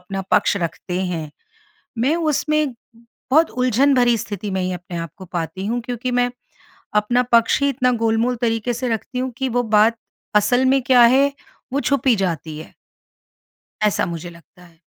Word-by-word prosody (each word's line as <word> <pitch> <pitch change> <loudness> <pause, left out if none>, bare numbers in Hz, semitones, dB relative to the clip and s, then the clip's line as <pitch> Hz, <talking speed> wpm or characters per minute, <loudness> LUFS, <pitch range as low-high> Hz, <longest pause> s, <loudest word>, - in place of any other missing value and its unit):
अपना 195 +2 -5
पक्ष - - +3
रखते 180 +1 -4
हैं। 160 -4 -4 0.7
मैं 265 +8 +2
उसमें, 305 -3 0 0.6
बहुत 315 +3 +5
उलझन 255 +3 +2
भरी 240 -2 +3
स्थिति 205 -2 -5
में 190 -1 -1
ही 185 - -1
अपने 175 0 -7
आप 165 0 -4
को 190 - -10
पाती 170 +1 -4
हूँ 240 +1 -1
क्योंकि 250 +1 -3
मैं, 245 0 +2 0.7
अपना 210 +4 +2
पक्ष 235 +4 +4
ही 280 - +3
इतना 250 -1 +1
गोल-मोल 230 +2 +1
तरीक़े 225 +1 0
से 250 +1 -3
रखती 235 +2 -3
हूँ 260 0 -2
कि 265 -1 -1
वो 245 +1 +1
बात 220 +1 +3 0.4
असल 245 +5 +3
में 270 +1 +3
क्या 250 -1 +5
है? 270 +4 +5 0.4
वो 280 - +1
छुप 280 -3 0
ही 235 - +5
जाती 165 -5 -3
है। 155 - -11 1.1
ऐसा 210 -3 +2
मुझे 170 0 -6
लगता 175 +2 -18
है। 165 -2 -21
230 Hz, 175 wpm, -20 LUFS, 185-255 Hz, 1.1 s, बहुत